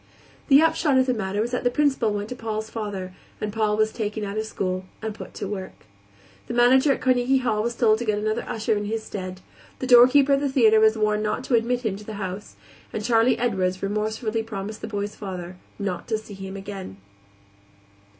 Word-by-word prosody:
The 280 +2 +7
upshot 320 -4 +2
of 260 - +4
the 255 - +1
matter 205 -2 -2
was 235 +2 -2
that 250 - -2
the 245 - +3
Principal 265 -4 +1
went 205 0 -3
to 250 - -5
Paul's 220 -2 -4
father, 200 -4 -5 0.3
and 210 -1 -3
Paul 215 -1 +1
was 215 0 +2
taken 215 -1 -3
out 200 0 -4
of 215 0 -2
school 185 -2 -3
and 220 -1 -4
put - - -10
to 200 - -4
work. 190 -2 -7 0.6
The - - -4
manager 260 +4 +5
at - - -1
Carnegie 255 +1 +3
Hall 230 -5 0
was 235 +2 -2
told 220 -2 +3
to 240 - -3
get 215 -2 +1
another 215 +2 -1
usher 220 0 0
in 205 0 -2
his 220 +1 -3
stead; 185 -3 -6 0.4
the - - -4
doorkeeper 255 +3 +7
at 275 - +3
the 285 0 0
theater 225 -5 +5
was 220 0 +4
warned 215 0 +1
not 215 +4 -1
to 260 - -3
admit 240 +2 +2
him 200 -3 -1
to 210 - -11
the 215 - -7
house; 195 0 -6 0.4
and 215 - -4
Charley 235 0 +3
Edwards 190 -6 -1
remorsefully 215 +2 -1
promised 215 -1 -6
the - - -5
boy's 205 -1 -3
father 185 -3 -7 0.2
not 195 -4 -4
to 220 - 0
see 215 -1 -11
him 195 0 -7
again. 195 - -7
215 Hz, 215 wpm, -24 LUFS, 205-240 Hz, 0.6 s, The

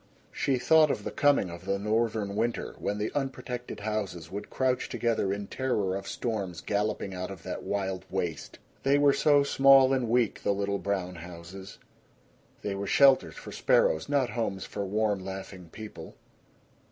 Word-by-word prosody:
She 135 -2 0
thought 155 +5 +5
of - - -2
the - - -4
coming 145 - +3
of 85 0 -10
the 100 - 0
Northern 105 -1 0
winter, 115 +2 -1
when 105 - -2
the 105 +1 -2
unprotected 125 -4 -4
houses 100 -6 -3
would 100 +2 -6
crouch 130 -1 0
together 115 -5 0
in 100 +1 -3
terror 105 -6 -1
of 100 - -5
storms 100 -8 -3
galloping 100 +1 -2
out 90 0 -4
of 95 -3 -9
that - - -5
wild 95 -2 -3
waste. 90 -4 -3 0.2
They 140 +1 +3
were 145 -1 +5
so 145 -1 +4
small 135 -1 +6
and 125 -4 0
weak, 120 -3 +1
the 100 - +1
little 100 0 -1
brown 95 -3 -2
houses. 90 +3 -10 0.9
They 100 - -2
were 100 0 -4
shelters 135 -2 +5
for - - -9
sparrows, 80 - +2
not 135 -5 +1
homes 105 -4 -2
for 100 - -4
warm 105 -1 0
laughing 95 -2 -8
people. 110 -1 -9
105 Hz, 165 wpm, -28 LUFS, 95-125 Hz, 0.9 s, small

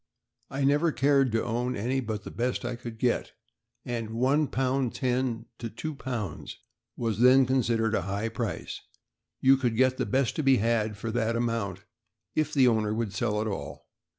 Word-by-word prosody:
I 140 0 -2
never 145 +4 +3
cared 135 -2 +3
to 115 0 +1
own 120 +2 -1
any 125 +6 -1
but 110 -4 -4
the - - -8
best 120 +1 -2
I 120 0 -2
could 120 -1 -8
get, 120 +1 0 0.5
and 115 -3 -3
£1 130 +6 +2
10s. 130 -2 0
to 115 - -4 0.2
£2 120 - -5 0.4
was 115 -3 -1
then 130 +1 +7
considered 120 -4 +1
a 100 - +2
high 100 +5 -2
price. 115 -2 -4 0.6
You 135 +1 +6
could 120 -4 -1
get 130 0 +3
the - - -1
best 130 -1 +1
to - - +1
be 135 -3 +4
had 110 -1 0
for 115 +2 -4
that 115 0 0
amount, 115 -6 -2 0.5
if 155 -1 0
the 135 -4 +4
owner 110 -2 +2
would 110 -3 -2
sell 105 0 0
at 110 - -2
all. 95 -10 -5
120 Hz, 175 wpm, -28 LUFS, 110-130 Hz, 0.6 s, then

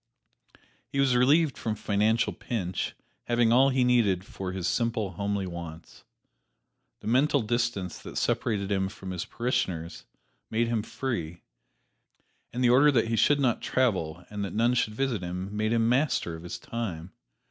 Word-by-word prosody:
He 140 - -2
was 135 -2 +3
relieved 140 +4 +3
from 110 -1 -2
financial 110 +2 +1
pinch, 95 -7 -3 0.3
having 120 -1 +3
all 135 +3 +6
he 130 -1 +2
needed 110 -7 +3
for 95 -2 -5
his 90 -1 -3
simple, 115 -3 0
homely 100 +2 -2
wants. 85 -2 -9 1.0
The - - -8
mental 135 +3 +3
distance 115 -6 -1
that - - -8
separated 100 -3 0
him 95 -1 +1
from 95 -2 -8
his 90 -2 -3
parishioners 90 -9 -2 0.4
made 115 +1 +1
him 115 -2 +1
free, 90 -9 -4 1.1
and 125 +1 -2
the 120 - +5
order 140 +4 +6
that 115 -4 +2
he 115 - +1
should 145 +5 +4
not 125 -4 +1
travel 90 -10 0
and 105 -1 -3
that 100 -2 -5
none 120 +3 +3
should 110 -3 0
visit 130 -5 -1
him 90 +3 -5
made 110 +1 0
him 115 -1 +2
master 125 - +1
of 80 - -9
his 85 - -6
time. 95 -7 -5
110 Hz, 160 wpm, -28 LUFS, 95-125 Hz, 1.1 s, all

